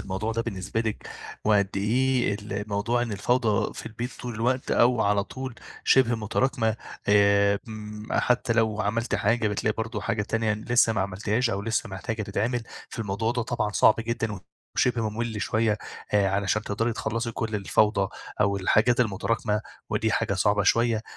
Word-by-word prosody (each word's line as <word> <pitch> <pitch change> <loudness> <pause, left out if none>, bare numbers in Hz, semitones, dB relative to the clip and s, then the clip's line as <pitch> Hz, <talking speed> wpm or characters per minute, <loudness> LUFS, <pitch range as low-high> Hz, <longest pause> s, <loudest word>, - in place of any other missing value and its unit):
الموضوع 100 +4 -3
ده 115 +1 -1
بالنسبة 100 0 -3
لِك 110 -2 -3 0.4
وقد 100 -2 +3
إيه 120 +1 +1
الموضوع 105 +3 -1
إن 115 -3 -3
الفوضى 110 +1 +1
في - - -8
البيت 120 +3 -5
طول 120 -1 -5
الوقت 125 +4 0
أو 120 -1 +4
على 100 -1 +2
طول 130 +1 -6 0.3
شِبه 125 -3 +4
متراكمة، 110 +1 0 0.3
آآ 100 0 +5
امم 105 0 -8
حتّى 125 -1 +2
لو 110 -2 +1
عملتِ 115 +2 -1
حاجة 110 +2 +2
بتلاقي 105 +1 0
برضه 110 -1 -3
حاجة 105 +2 -1
تانية 110 0 0
لسّه 115 +1 +2
ما 110 - 0
عملتيهاش 105 +5 0
أو 100 0 -2
لسّه 115 +2 -1
محتاجة 105 +3 -4
تتعمل، 110 +5 -1 0.3
في - - -9
الموضوع 110 +2 -1
ده 120 - -1
طبعًا 120 -2 -1
صعب 110 - +5
جدًا 115 -1 -2
و 95 - -7 0.4
وشِبه 115 -3 +2
مُمِل 110 -1 -3
شوية، 110 -2 +1 0.4
آآ 100 -2 +4
علشان 100 +2 0
تقدري 115 +3 -1
تخلّصي 115 +1 -2
كل 110 -1 -3
الفوضى 100 0 +2 0.3
أو 100 -1 +3
الحاجات 110 +6 +3
المتراكمة 105 0 0 0.3
ودي - - +1
حاجة - - 0
صعبة 105 0 +2
شوية. 115 +2 +2
110 Hz, 165 wpm, -26 LUFS, 105-115 Hz, 0.4 s, آآ